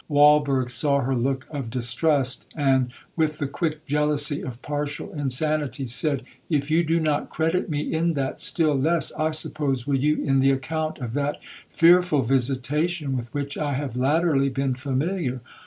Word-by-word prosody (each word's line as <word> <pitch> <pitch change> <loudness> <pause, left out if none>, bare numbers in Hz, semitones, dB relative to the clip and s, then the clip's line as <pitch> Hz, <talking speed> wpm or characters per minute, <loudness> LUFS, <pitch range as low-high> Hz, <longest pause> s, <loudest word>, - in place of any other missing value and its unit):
Walberg 145 -3 +4
saw 140 +2 +1
her 130 +1 -1
look 130 +2 -1
of 140 -6 -4
distrust, 130 +2 +1
and, 135 -4 +2 0.2
with 155 -2 0
the 145 - -2
quick 155 +2 -3
jealousy 150 0 +1
of 125 -2 -7
partial 145 0 -4
insanity, 145 0 -2
said, 135 +3 0 0.3
'If 150 -2 0
you 165 +2 +4
do 165 +1 +1
not 155 -2 0
credit 165 +4 -1
me 150 -2 -1
in 165 +2 0
that, 135 -3 -3
still 155 -3 +3
less, 160 +5 +1
I 155 0 0
suppose, 150 -5 -1
will 145 - -1
you 150 +3 +1
in 135 -1 +2
the 135 +1 +4
account 155 +4 -2
of 120 -4 -5
that 145 +1 -1 0.3
fearful 170 -4 +4
visitation 135 +5 0
with 120 -2 -5
which 140 -1 -4
I 145 -2 -1
have 135 -3 -3
latterly 140 +1 +2
been 135 0 -1
familiar.' 135 +2 -2
145 Hz, 165 wpm, -24 LUFS, 135-155 Hz, 0.3 s, Walberg